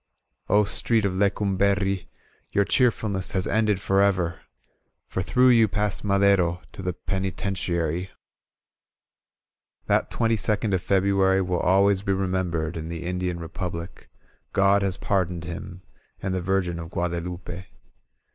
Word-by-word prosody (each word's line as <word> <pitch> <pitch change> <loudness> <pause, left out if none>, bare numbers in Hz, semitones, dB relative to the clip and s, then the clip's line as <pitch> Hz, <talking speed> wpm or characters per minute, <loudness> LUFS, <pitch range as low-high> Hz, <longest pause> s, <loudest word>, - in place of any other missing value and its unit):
"0 105 +2 +4
Street 110 +1 +1
of 95 - 0
Lecumberri 100 -1 +1 0.5
Your 100 - +3
cheerfulness 105 -7 +1
has 95 -1 0
ended 105 -3 +1
forever 95 -4 +1 0.7
For 95 - -3
through 125 +7 +4
you 115 -3 +6
passed 105 0 -2
Madero 100 -4 +3
To - - -9
the 90 -1 -2
Penitentiary. 90 -2 -2 1.8
That - - +1
twenty 115 -1 +1
second 105 0 0
of 95 - +1
February 95 0 +2
Wm 90 -1 -1
always 95 +1 +4
be 100 -1 0
remembered 90 -4 -1
in 80 0 -5
the 85 0 -5
Indian 90 0 -2
Republic. 85 0 -6 0.4
God 100 +1 +4
has 95 -1 -1
pardoned 90 -4 -1
him 90 +2 -7 0.4
And 95 -1 -3
the 95 - -1
Virgin 90 -2 0
of 85 0 -7
GuadeVupe. 90 +1 -4
95 Hz, 130 wpm, -25 LUFS, 90-100 Hz, 1.8 s, you